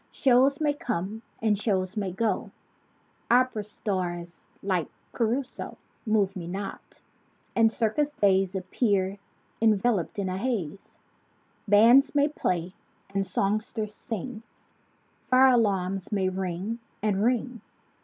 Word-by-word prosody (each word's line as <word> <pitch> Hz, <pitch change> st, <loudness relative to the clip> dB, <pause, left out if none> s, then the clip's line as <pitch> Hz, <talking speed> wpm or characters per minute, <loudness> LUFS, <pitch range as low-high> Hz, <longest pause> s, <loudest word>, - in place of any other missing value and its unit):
Shows 270 Hz, +1 st, +3 dB
may 300 Hz, -2 st, +2 dB
come 220 Hz, -, -3 dB, 0.2 s
and 210 Hz, -3 st, +2 dB
shows 190 Hz, -2 st, 0 dB
may 200 Hz, -3 st, -2 dB
go. 220 Hz, +4 st, -1 dB, 0.8 s
Opera 245 Hz, -3 st, +3 dB
stars 175 Hz, -5 st, -4 dB, 0.2 s
like 185 Hz, -5 st, 0 dB, 0.2 s
Ca 235 Hz, -, -1 dB
ru 240 Hz, +5 st, +1 dB
so 260 Hz, -, -9 dB, 0.3 s
Move 205 Hz, -2 st, +2 dB
me 175 Hz, -3 st, -6 dB
not. 195 Hz, +3 st, -7 dB, 0.6 s
And 225 Hz, -1 st, +5 dB
circus 285 Hz, +7 st, 0 dB
days 195 Hz, -3 st, +2 dB
Appear 195 Hz, 0 st, 0 dB, 0.4 s
enveloped 215 Hz, -4 st, +2 dB
in 200 Hz, -2 st, -1 dB
a 185 Hz, +1 st, -2 dB
haze. 200 Hz, -, -3 dB, 0.7 s
Bands 230 Hz, +8 st, +6 dB
may 290 Hz, 0 st, +4 dB
play, 180 Hz, -, -2 dB, 0.4 s
and 195 Hz, 0 st, 0 dB
songsters 210 Hz, +3 st, -1 dB
sing; 225 Hz, +2 st, -6 dB, 0.9 s
Fire 260 Hz, 0 st, +6 dB
alarms 195 Hz, -5 st, +1 dB
may 190 Hz, -3 st, +1 dB
ring 190 Hz, +4 st, -3 dB, 0.2 s
and 205 Hz, -2 st, +1 dB
ring. 245 Hz, -1 st, 0 dB
210 Hz, 120 wpm, -27 LUFS, 190-235 Hz, 0.9 s, Bands